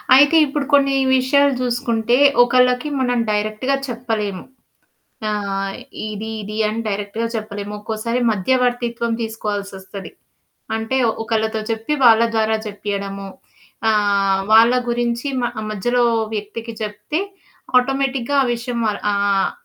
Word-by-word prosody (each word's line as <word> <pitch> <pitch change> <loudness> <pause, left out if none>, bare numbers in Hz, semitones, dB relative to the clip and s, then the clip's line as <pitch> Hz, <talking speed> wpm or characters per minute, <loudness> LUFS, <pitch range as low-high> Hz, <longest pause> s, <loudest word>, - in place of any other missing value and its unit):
అయితే 285 +4 +6
ఇప్పుడు 285 0 -2
కొన్ని 275 -1 +4 0.2
విషయాలు 280 +2 +3
జూసుకుంటే, 240 -1 0 0.3
ఒకళ్ళకి 250 +3 +2
మనం 245 -1 +1
డైరెక్ట్‌గా 215 +6 0
చెప్పలేము. 225 -6 -3 0.9
ఆహ్, 195 -2 -2 0.3
ఇది 215 +1 -5
ఇది 210 +1 -6
అని 220 +2 -3
డైరెక్ట్‌గా 205 +3 -3
చెప్పలేము. 205 -1 -5
ఒక్కోసారి 220 +3 -2
మధ్యవర్తిత్వం 240 +2 0
తీసుకోవాల్సొస్తది. 200 -3 -5 0.7
అంటే 225 +4 -1 0.3
ఒకళ్ళతో 220 -1 -1
చెప్పి 225 +6 -2
వాళ్ళ 230 -1 +7
ద్వారా 220 0 +2
చెప్పియడము. 200 -1 -5 0.6
ఆహ్, 200 -2 +2
వాళ్ళ 230 +2 +7 0.2
గురించి 240 +2 -1
మ - - -2 0.3
మధ్యలో 240 +4 +1 0.3
వ్యక్తికి 225 +3 -6
జెప్తే 215 +9 -3 0.6
ఆటోమేటిక్‌‌గా 270 0 -1
ఆ - - -1
విషయం 235 0 -4
వాళ్ళ 210 -1 -2
ఆహ్, 200 -1 +1
225 Hz, 110 wpm, -20 LUFS, 205-245 Hz, 0.9 s, వాళ్ళ